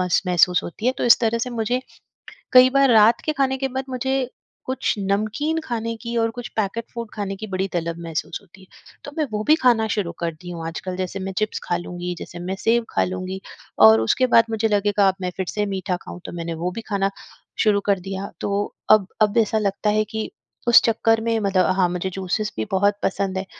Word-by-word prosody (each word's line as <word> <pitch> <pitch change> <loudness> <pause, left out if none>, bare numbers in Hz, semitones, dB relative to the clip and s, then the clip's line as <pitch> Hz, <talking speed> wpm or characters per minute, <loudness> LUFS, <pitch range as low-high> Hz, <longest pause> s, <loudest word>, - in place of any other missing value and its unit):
मस 180 -1 +2
महसूस 180 0 +3
होती 210 +7 -6
है। 255 - +4
तो - - -1
इस 240 - +7
तरह 230 0 +1
से 250 +2 -3
मुझे 240 +2 -1 0.7
कई 255 0 +8
बार 275 0 +4
रात 220 +1 +5
के 310 - +1
खाने 270 -2 +1
के 270 0 -1
बाद 265 +1 -4
मुझे 260 0 -1 0.4
कुछ 260 0 -1
नमकीन 215 +11 -1
खाने 230 -4 -3
की 235 -1 -5
और 225 0 +2
कुछ 245 +1 -7
पैकेट 220 +2 -2
फूड 235 -2 -5
खाने 200 -2 -4
की 215 +3 -7
बड़ी 190 0 -2
तलब 170 -1 -2
महसूस 160 0 -4
होती 195 -1 -19
है। 190 - -17 0.4
तो 285 - -7
मैं 310 - +1
वो 210 0 -2
भी 305 +5 +5
खाना 230 -3 +4
शुरू 185 -5 -2
कर 170 -1 -2
दी 180 - -9
हूँ 165 -2 -6
आजकल 180 +3 -5
जैसे 185 +1 -3
मैं 190 0 -4
चिप्स 215 0 -1
खा 175 - -1
लूँगी 175 0 -5
जैसे 175 - -8
मैं 185 +2 -3
सेव 230 +1 +2
खा - - +1
लूँगी 185 +1 -4 0.5
और 110 0 +6
उसके 255 - +2
बाद 230 - +8
मुझे 225 0 0
लगेगा 205 -1 +2
अब 190 - +2
मैं 180 -1 -2
फिर 190 - -1
से 210 -1 -1
मीठा 190 -2 -2
खाऊँ। - - -9
तो - - -6
मैंने 170 -1 -4
वो 180 - 0
भी 230 - -4
खाना 195 -1 +1 0.5
शुरू 210 -2 +3
कर 200 -2 +2
दिया। 195 +1 -6
तो 200 0 0 0.3
अब 215 -3 +5
अब 215 +1 +3
ऐसा 220 -1 +3
लगता 205 0 0
है 215 +1 +2
कि 220 0 -3 0.4
उस 235 - +8
चक्कर 225 0 +2
में 225 0 0
मतलब 195 -3 +2
हाँ, 185 -2 +3
मुझे 180 +1 -2
जूसेस 195 +3 -2
भी - - -2
बहुत 200 +2 +3
पसंद 190 0 -1
है। 190 - -3
205 Hz, 225 wpm, -22 LUFS, 185-230 Hz, 0.7 s, कई